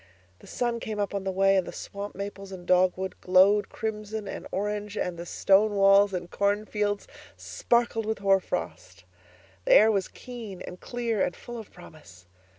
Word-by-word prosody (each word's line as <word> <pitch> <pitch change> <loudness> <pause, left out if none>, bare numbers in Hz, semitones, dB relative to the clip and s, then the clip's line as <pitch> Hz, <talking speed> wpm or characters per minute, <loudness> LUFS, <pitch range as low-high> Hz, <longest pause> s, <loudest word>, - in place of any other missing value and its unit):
The - - -16
sun 240 -1 -2
came 215 -2 -5
up 205 -1 -1
on 200 -1 -3
the 190 - 0
way, 195 +1 +3
and 185 - 0
the - - -5
swamp 200 +1 -7
maples 195 0 -7
and 180 -2 -9
dogwood 185 +1 +1
glowed 190 +3 +4
crimson 215 -1 -5
and - - -6
orange 210 +1 -3
and 180 - -2
the 170 +1 -8
stone 205 +4 +3
walls 195 0 +5
and 175 -2 -5
cornfields 205 0 -1 0.3
sparkled 235 -2 0
with 220 - -1
hoar 195 -1 +3
frost; 100 - -6 0.6
the - - +4
air 220 +1 +7
was 195 -3 0
keen 230 -7 -9
and 180 - -9
clear 235 -4 -1
and - - -2
full 240 -1 -8
of 220 - -10
promise. 150 - -15
200 Hz, 175 wpm, -27 LUFS, 185-215 Hz, 0.6 s, air